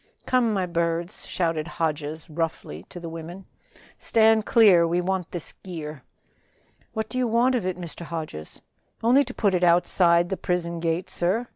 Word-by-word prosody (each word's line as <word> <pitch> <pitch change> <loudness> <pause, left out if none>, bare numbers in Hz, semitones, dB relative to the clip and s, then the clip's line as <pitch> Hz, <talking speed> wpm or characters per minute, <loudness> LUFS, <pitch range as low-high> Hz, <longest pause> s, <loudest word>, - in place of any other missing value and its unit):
"Come, 250 -3 +2
my 195 -3 0
birds," 170 +1 -2
shouted 165 -3 -1
Hodges 155 -2 -3
roughly 160 - -4
to 175 - -8
the 170 - -7
women. 165 +3 -8 0.5
"Stand 220 -1 +3
clear, 190 -7 +6
we 170 +2 +1
want 185 -1 -2
this 175 -3 -4
gear." 155 -6 -7 0.9
"What 220 0 -2
do 255 - -3
you 250 - +1
want 235 +3 +3
of 230 -7 0
it, 185 -1 -2
Mr. 175 -1 -7
Hodges?" 155 - -6 0.4
"Only 250 +5 +5
to 255 - -8
put 200 -3 +2
it 180 -1 +1
outside 175 0 +4
the 190 - -2
prison 170 -1 -2
gate, 165 +2 -2
sir. 195 +8 0
175 Hz, 165 wpm, -25 LUFS, 165-205 Hz, 0.9 s, clear